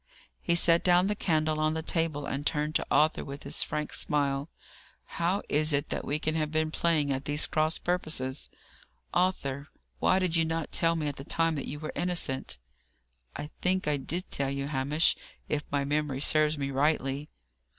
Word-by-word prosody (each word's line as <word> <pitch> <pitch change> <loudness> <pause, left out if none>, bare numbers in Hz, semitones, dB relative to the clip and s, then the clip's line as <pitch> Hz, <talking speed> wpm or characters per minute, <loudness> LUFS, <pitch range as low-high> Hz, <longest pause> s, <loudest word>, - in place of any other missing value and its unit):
He 170 - +2
set 170 0 +4
down 180 0 +5
the 210 +1 0
candle 155 -5 +1
on 155 0 +1
the 160 - -3
table, 160 -3 0
and 140 +1 -3
turned 150 0 0
to - - +1
Arthur 155 +1 +3
with 140 0 -8
his - - 0
frank 150 0 -2
smile. 140 -1 0 0.6
"How 175 +4 -1
is 155 +1 +2
it 140 0 0
that - - -2
we 145 - -1
can 155 0 -1
have 155 -1 0
been 155 0 0
playing 155 -4 +1
at 135 +1 -4
these 145 +1 +4
cross 155 +1 +1
purposes, 155 -7 -2 0.6
Arthur? 150 -6 0 0.3
Why 185 - +4
did 185 -3 0
you 165 - +4
not 165 -1 -2
tell 165 0 +2
me 155 -2 -1
at 145 - -4
the 135 - -7
time 165 +3 +1
that 145 - -4
you 145 - -5
were 155 - -5
innocent?" 170 - -1 0.8
"I 150 +2 -6
think 185 -2 +1
I 150 -1 +2
did 170 +7 -4
tell 140 -1 0
you 140 0 -2
so, 140 - -6
Hamish: 145 +4 +2 0.3
if 150 -1 -2
my 140 -1 0
memory 145 -2 -1
serves 155 +1 +3
me 140 -1 -2
rightly." 140 0 0
155 Hz, 190 wpm, -29 LUFS, 140-165 Hz, 0.8 s, down